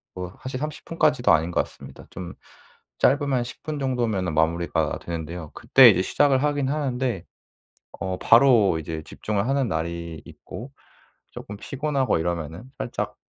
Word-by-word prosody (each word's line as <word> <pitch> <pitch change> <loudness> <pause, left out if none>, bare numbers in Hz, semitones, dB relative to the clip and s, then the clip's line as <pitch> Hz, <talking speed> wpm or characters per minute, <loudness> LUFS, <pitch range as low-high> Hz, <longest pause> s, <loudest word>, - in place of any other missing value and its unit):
뭐 90 0 -6
사실 130 0 -4
30 150 +1 -5
분까지도 155 -6 +3
아닌 80 +3 +2
것 - - +2
같습니다. - - -13
좀 90 -1 -7 0.7
짧으면 140 -2 +2
10 120 - -10
분 155 -2 -4
정도면은 115 - -1
마무리가 85 +2 0
되는데요. 85 -1 -6
그때 130 -3 +7
이제 95 -4 +3
시작을 135 +5 +2
하긴 145 -2 0
하는데 130 - -1 0.8
어 95 -1 -2
바로 115 -8 +5
이제 80 0 -5
집중을 105 +3 -3
하는 135 -2 +1
날이 85 -1 -4
있고 130 +4 -10 0.6
쪼끔 105 - -8
피곤하고 135 -1 -1
이러면은 85 +2 -3
살짝 - - -4
110 Hz, 310 characters per minute, -24 LUFS, 85-135 Hz, 0.8 s, 그때